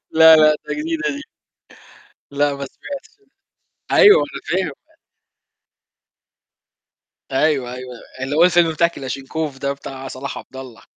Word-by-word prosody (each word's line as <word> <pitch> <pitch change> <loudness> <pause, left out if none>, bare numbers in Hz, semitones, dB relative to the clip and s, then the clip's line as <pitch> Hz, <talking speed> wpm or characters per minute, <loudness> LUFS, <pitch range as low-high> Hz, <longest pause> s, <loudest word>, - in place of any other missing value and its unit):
لا، 160 0 +8
لأ، 155 -1 +5
ده - - -2
جديدة 325 +2 -2
دي. 290 - -8 1.1
لأ، 145 0 0
ما 140 - -6
سمعتش، 280 - -10 0.8
أيوه، 415 +3 +7
أنا - - -4 0.2
فاهم. - - -4 2.6
أيوه، 135 -3 +1
أيوه. 125 0 -8 0.3
اللي 135 +3 -3
هو 165 - +6
الفيلم 175 -2 +4
بتاع 170 +2 +3
كلاشنكوف 135 0 -5
ده 140 +1 -2
بتاع 135 -1 -9
صلاح 130 +1 -6
عبد 130 - -13
الله. 130 -3 -10
145 Hz, 125 wpm, -19 LUFS, 135-165 Hz, 2.6 s, لا